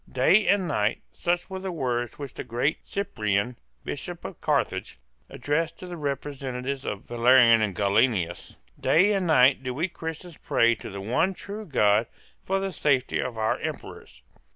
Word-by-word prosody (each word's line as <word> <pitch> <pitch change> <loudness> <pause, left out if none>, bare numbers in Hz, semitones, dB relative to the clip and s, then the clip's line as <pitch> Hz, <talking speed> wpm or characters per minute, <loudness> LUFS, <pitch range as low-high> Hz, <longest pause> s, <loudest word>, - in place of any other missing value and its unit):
"Day 160 +12 +4
and 195 -2 +3
night," 105 -7 0
such 175 0 -1
were 190 -1 -6
the 190 0 -4
words 125 -7 -2
which 140 -3 -7
the - - -6
great 120 +6 -1
Cyprian, 110 - -1 0.2
Bishop - - -6
of - - -8
Carthage, - - -1 0.3
addressed 165 +3 -2
to - - -9
the 180 -1 -7
representative 140 -3 -4
of 100 0 -4
Valerian 120 -1 +5
and 100 -4 -1
Gallienus, 100 -3 +1 0.2
"day 195 +6 +4
and 190 -3 0
night 130 -4 +5
do 125 -1 -4
we 160 +7 0
Christians 165 -1 -7
pray 115 0 +3
to - - -8
the 100 -1 -7
one 145 - +1
true 205 +2 -8
God 105 -6 +3 0.4
for 195 +1 0
the 195 0 -2
safety 140 -7 +1
of 125 -2 -3
our 110 -1 0
Emperors." - - -7
130 Hz, 165 wpm, -26 LUFS, 115-175 Hz, 0.4 s, Valerian